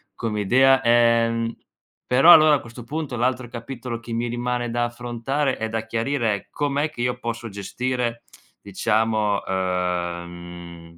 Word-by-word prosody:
come 110 -2 -3
idea. 130 +6 +4
Ehm, 115 -1 +2 0.5
però 135 +7 +6
allora, 155 -2 +8
a - - -1
questo 120 0 -11
punto, 145 +1 -4
l'altro 125 +1 -1
capitolo 120 0 -6
che 115 0 -10
mi 115 +1 -1
rimane 120 0 -2
da 120 +1 0
affrontare 120 +4 -2
e 110 - -2
da 110 0 -3
chiarire 115 -1 0
è 100 - -9
com'è 145 +1 -1
che 120 - -7
io 125 0 0
posso 115 -1 -5
gestire, 120 +4 -3 0.4
diciamo, 105 +1 0
uhm, 90 -2 -2
mhmm, 85 -1 -11
115 Hz, 150 wpm, -23 LUFS, 105-125 Hz, 0.5 s, allora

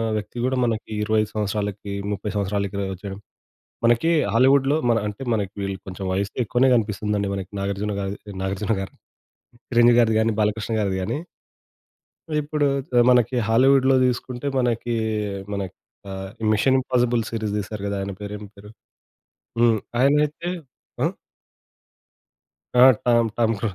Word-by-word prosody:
వ్యక్తి 105 +3 -5
గూడా 130 +1 +1
మనకి 115 -2 -1
25 110 0 +1
సంవత్సరాలకి, 105 -1 -2 0.2
30 100 +1 -3
సంవత్సరాలకిల 100 0 -1
వచ్చేయడం. 95 +1 -8 0.7
మనకి 120 +8 +3 0.2
హాలీవుడ్‌లో 135 +3 +4
మన 115 - +3
అంటే 105 +5 -7
మనకి 100 -3 -2
వీళ్ళు 100 -1 -3
కొంచెం 95 +1 -6
వయస్సు 100 +2 -2
ఎక్కువనే 125 +4 +3
గనిపిస్తుందండి. 105 -2 0
మనకి 95 -2 -5
నాగార్జున 100 +1 -2
గారు 100 +1 -3 0.3
నాగార్జున 95 +3 -1
గారు 95 - -6 0.8
'చిరంజీవి' 120 -1 +5
గారిది 110 -2 +3
గానీ 115 - +2
'బాలకృష్ణ' 105 +2 0
గారిది 100 -2 0
గాని. 120 - -2 1.2
ఇప్పుడు 150 0 0 0.2
త - - -29 0.2
మనకి 125 0 +3
హాలీవుడ్‌లో 130 +3 +5
దిసుకుంటే 125 +1 -2
మనకి 120 -1 0 0.6
మన 100 - -2 0.5
ఆహ్, 95 0 -6 0.2
'మిషన్ 130 +5 +3
ఇంపాసిబుల్' 120 -3 +1
సీరీస్ 110 -3 -3
దీసారు 105 0 -5
గదా! 100 0 -2
ఆయన 100 0 -4
పేరు 105 0 -6
ఏం 105 - -10
పేరు? 105 +1 -13 0.9
హ్మ్. 115 -2 +4 0.2
ఆయనయితే 150 +5 +2 0.5
ఆ? - - +4 1.7
ఆ! 125 +1 +7 0.2
Tom 115 -1 +4
Tom 115 -1 +2
cruise 100 -1 -3
110 Hz, 135 wpm, -23 LUFS, 100-125 Hz, 1.7 s, ఆ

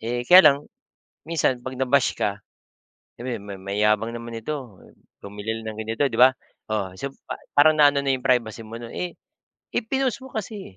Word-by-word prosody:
Eh, 120 +2 -3
kaya 180 +7 +9
lang, 140 0 +2 0.7
minsan 145 -6 0
'pag 130 0 -6
na-bash 130 0 +3
ka, 100 0 -1 0.8
sabihin 120 -4 -5
may 100 - -6
"Mayabang 105 +3 +1
naman 115 0 -7
nito, 125 -2 -6 0.5
bumili 105 +2 -5
lang 110 - -4
ng 110 - -9
ganito" 115 +6 -1
'di 115 - -3
ba? 130 0 +7 0.3
Oh, 105 -4 -2
so 140 - -2 0.2
pa - - -6 0.2
parang 155 +1 +5
naano 145 -1 +5
na 135 - +1
yung 130 -1 -3
privacy 120 -3 +1
mo 115 - -8
nun. 115 0 -8
Eh 180 -1 -5 0.6
eh, - - +1
pinost 265 +2 -1
mo 265 - -10
kasi, 205 - -7
125 Hz, 185 wpm, -24 LUFS, 110-145 Hz, 0.8 s, kaya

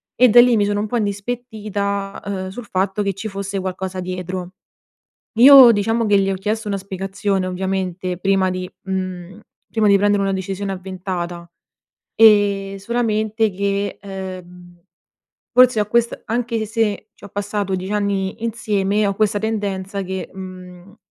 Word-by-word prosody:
e 250 0 +5
da 240 +3 +7
lì 245 -1 +4
mi 205 - +2
sono 205 0 0
un 215 - -2
po' 240 - -1
indispettita, 205 -2 -3
ehm, 190 -2 -4
sul 225 +4 -8
fatto 195 +1 -1
che 200 -1 0
ci 205 +4 -6
fosse 195 -1 -4
qualcosa 185 0 -4
dietro. 180 0 -5 0.9
Io 265 -2 +10
diciamo 225 +2 0
che 205 -1 +4
gli 195 0 0
ho - - 0
chiesto 210 +3 -3
una 200 - -1
spiegazione 195 0 -2
ovviamente 185 -1 -3
prima 195 -1 +2
di 185 0 -4
mhmm, 185 -1 -5 0.3
prima 220 -2 +2
di 200 - +6
prendere 205 0 +2
una 195 0 0
decisione 195 +1 -4
avventata. 180 -2 -5 0.7
Ehm, 205 -3 +4
solamente 220 0 0
che 200 +1 -2
uhm, 180 -2 -9 0.7
forse 250 -3 +6
ho 210 - 0
quest 235 +2 0
anche 230 -1 -1
se, 215 -1 -1
ci - - -17
ho - - -9
passato 205 -1 -3
10 185 +3 -5
anni 200 0 -1
insieme, 210 -3 0
ho 200 - 0
questa 210 0 +1
tendenza 200 -2 -3
che, 190 0 -5
mhmm, 185 +1 -11
200 Hz, 155 wpm, -20 LUFS, 190-215 Hz, 0.9 s, Io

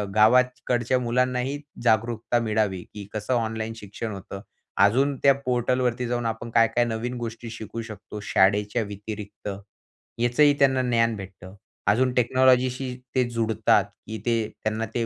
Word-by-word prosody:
गावाकडच्या 125 +2 +3
मुलांनाही 125 +3 0 0.2
जागरूकता 115 +1 +1
मिळावी 105 -4 0
की 105 -1 -7
कसं 110 +4 -2
ऑनलाईन 110 -1 -1
शिक्षण 105 +2 -6
होतं. 100 0 -8 0.4
अजून 135 +8 +3
त्या 140 - +7
पोर्टलवरती 125 0 0
जाऊन 120 0 -2
आपण 115 +1 -3
काय, 115 0 +5
काय 120 +1 +1
नवीन 120 +1 -3
गोष्टी 115 0 -6
शिकू 115 0 -6
शकतो 110 -2 -9
शाळेच्या 105 +4 +2
व्यतिरिक्त, 105 0 -7 0.7
याचंही 120 +5 +4
त्यांना 130 -2 +4
ज्ञान 115 -2 +2
भेटतं. 95 -1 -10 0.3
अजून 125 +5 +3
टेक्नॉलॉजीशी 130 +1 +2 0.2
ते 130 - +4
जुडतात, 110 -3 +2 0.2
की 110 +1 -5
ते 120 -1 +2 0.3
त्यांना 110 +1 -1
ते 120 -1 +1
115 Hz, 135 wpm, -25 LUFS, 110-125 Hz, 0.7 s, त्या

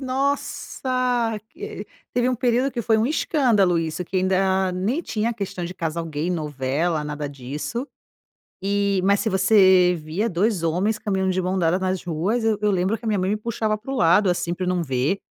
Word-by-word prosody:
nossa, 255 -3 -1 0.2
eh, 415 +5 -7 0.3
teve 245 0 +1
um 255 - +1
período 245 +2 +1
que 240 - -3
foi 220 -1 +3
um 220 - +2
escândalo 245 - +2
isso 165 +2 -3
que 185 - -4
ainda 190 0 +2
nem 200 - -1
tinha 230 -7 -1
questão 195 -5 -5
de 175 - -5
casal 165 -1 -3
gay 155 +1 -3
novela 150 0 -1
nada 150 0 -4
disso, 145 - -5 0.7
e 200 0 +1
mas 200 +1 +3
se 220 - 0
você 190 -2 +5
via 170 +9 -1
2 195 0 0
homens 185 +7 0
caminhando 190 -3 0
de 185 - 0
mãos 185 +1 -1
dadas 175 +1 +2
nas 185 -1 -1
ruas 180 +8 -1
eu 220 -2 +2
eu 210 0 +2
lembro 190 +3 0
que 230 - -9
a - - +1
minha 210 -2 +1
mãe 185 +1 0
me 210 - +1
puxava 215 -1 -1
para 235 +6 -9
o 270 - -2
lado, 185 -1 +4
assim, 175 -1 0
pra 180 +1 -3
não 180 -1 0
ver. 135 +5 0
190 Hz, 195 wpm, -23 LUFS, 175-225 Hz, 0.7 s, você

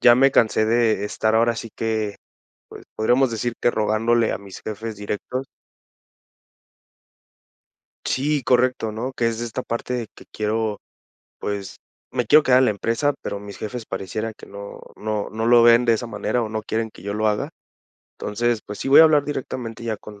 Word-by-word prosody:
ya 120 - +8
me 135 +2 +5
cansé 110 -2 +3
de 110 -3 +2
estar 110 +1 0
ahora 115 0 +3
sí 115 - -6
que, 110 -2 -1 0.5
pues, - - -11
podríamos 120 +3 +3
decir 115 +1 -2
que 120 - +3
rogándole 110 +2 +2
a - - -2
mis 100 -1 -11
jefes 110 +1 -5
directos. 105 +6 -4 2.6
Sí, 145 +1 0
correcto, 125 -3 +2
¿no?, 125 +5 -4
que 120 -3 0
es 115 0 -1
de - - -2
esta 120 +3 -4
parte 120 0 -3
que - - -15
quiero 110 -1 -1 0.6
pues, 100 -2 -4 0.3
me 125 -3 -1
quiero 150 +6 +7
quedar 125 -3 +5
en 130 - +5
la - - +3
empresa, 115 +8 0
pero 100 - -4
mis 100 0 -9
jefes 115 +1 -6
parecieran 105 +4 -4
que - - -13
no 100 0 -9 0.2
no 105 -1 -2
no 110 +1 -2
lo 120 0 +7
ven 120 +1 +6
de 115 - +4
esa 115 +2 -1
manera, 115 +3 -1
o 110 - -3
no 110 0 -3
quieren 110 0 -2
que - - -15
yo 100 +1 -4
lo 110 0 +1
haga. 105 - -1 0.7
Entonces, 115 +1 -1
pues, 105 - -7
sí - - -3
voy 135 - +9
a 160 - +10
hablar 150 -2 +4
directamente 125 -5 -5
ya 110 -2 -2
con 105 0 -12
115 Hz, 185 wpm, -22 LUFS, 105-120 Hz, 2.6 s, a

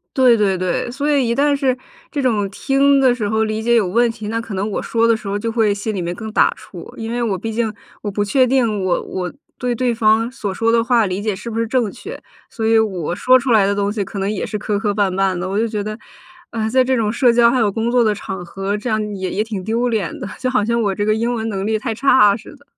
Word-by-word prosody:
对 255 -3 +5
对 195 -3 +1
对， 185 +6 -1
所 285 +4 -1
以 270 -4 +2
一 235 - 0
旦 285 0 +3
是 260 -2 0 0.3
这 285 - -2
种 210 -6 +1
听 275 +5 +2
的 260 -2 +4
时 215 -4 -2
候 220 0 +1
理 215 0 -2
解 235 +1 +2
有 215 -5 +3
问 235 +5 +2
题， 215 -2 -8
那 230 +1 -1
可 225 -3 -8
能 200 +3 -2
我 - - -2
说 230 0 +1
的 230 - +4
时 220 -3 -8
候 200 +1 -1
就 230 +2 -3
会 220 -3 +2
心 210 +2 -4
里 185 - -3
面 175 +1 -3
更 220 -2 -7
打 - - +3
怵， - - -11
因 225 0 -5
为 240 0 -2
我 205 -5 0
毕 225 +4 -4
竟 225 -1 0 0.3
我 205 - -3
不 205 +1 -1
确 255 +5 +3
定 230 -6 +1
我 180 -2 +1
我 180 -1 -4 0.3
对 250 -1 -1
对 245 0 0
方 225 +1 +2
所 205 -6 -4
说 225 +3 +1
的 230 0 +3
话 235 -3 +3
理 185 +1 -3
解 210 -2 -1
是 235 - -7
不 225 - -2
是 230 - 0
正 240 -4 0
确， 425 - -9 0.3
所 225 - -4
以 225 0 +4
我 180 -6 -1
说 255 +5 +5
出 245 0 -2
来 210 -3 +5
的 200 - 0
东 200 0 0
西 210 - -1
可 200 - -8
能 195 +1 -1
也 210 - -3
是 210 - -4
磕 205 0 -2
磕 210 -2 0
绊 200 -2 0
绊 190 -1 +1
的。 180 +1 -3
我 200 +3 -1
就 230 - +1
觉 210 -2 -3
得， 215 +1 -5 0.5
呃， 220 -1 -2
在 260 +2 +3
这 260 0 +1
种 215 -1 0
社 245 -1 +4
交 235 0 +5
还 255 - +1
有 210 -3 +2
工 225 +3 -1
作 245 -1 +4
的 215 -2 +2
场 190 -2 -6
合， 195 +3 -3
这 210 +3 -4
样 210 -1 -1
也 185 -1 -3
也 210 - 0
挺 210 -4 -5
丢 230 +4 0
脸 210 -7 -2
的， - - -5
就 255 - -1
好 250 -5 +1
像 235 0 +1
我 200 -3 0
这 205 - -1
个 215 - +3
英 230 +2 0
文 225 -1 -3
能 195 -2 -3
力 220 0 +1
太 225 0 -3
差 215 -4 +4
似 235 +6 -11
的。 285 - -22
220 Hz, 310 characters per minute, -19 LUFS, 205-240 Hz, 0.5 s, 对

